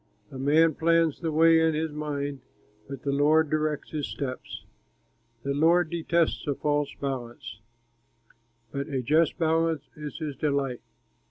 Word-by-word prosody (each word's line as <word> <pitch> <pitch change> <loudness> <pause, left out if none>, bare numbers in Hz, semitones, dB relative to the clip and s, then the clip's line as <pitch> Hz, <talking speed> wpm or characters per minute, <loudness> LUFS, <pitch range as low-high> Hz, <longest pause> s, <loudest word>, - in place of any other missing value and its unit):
A 130 - -8
man 155 +4 +4
plans 165 0 +2
the 165 -2 -2
way 165 +1 +5
in 160 -1 +2
his 160 0 -1
mind, 145 -2 -4 0.5
But 135 -2 -7
the 140 - 0
Lord 150 +2 +3
directs 155 -1 -1
his 150 -3 -3
steps. 130 -2 -6 0.8
The 140 - -1
Lord 165 +3 +3
detests 170 -1 0
a 145 - 0
false 145 0 0
balance, 120 -5 -5 1.1
But 140 +1 -3
a 135 -4 -2
just 155 +6 +2
balance 160 -2 +1
is 150 -1 -7
his 150 -3 -4
delight. 140 -4 -1
150 Hz, 145 wpm, -27 LUFS, 140-160 Hz, 1.1 s, way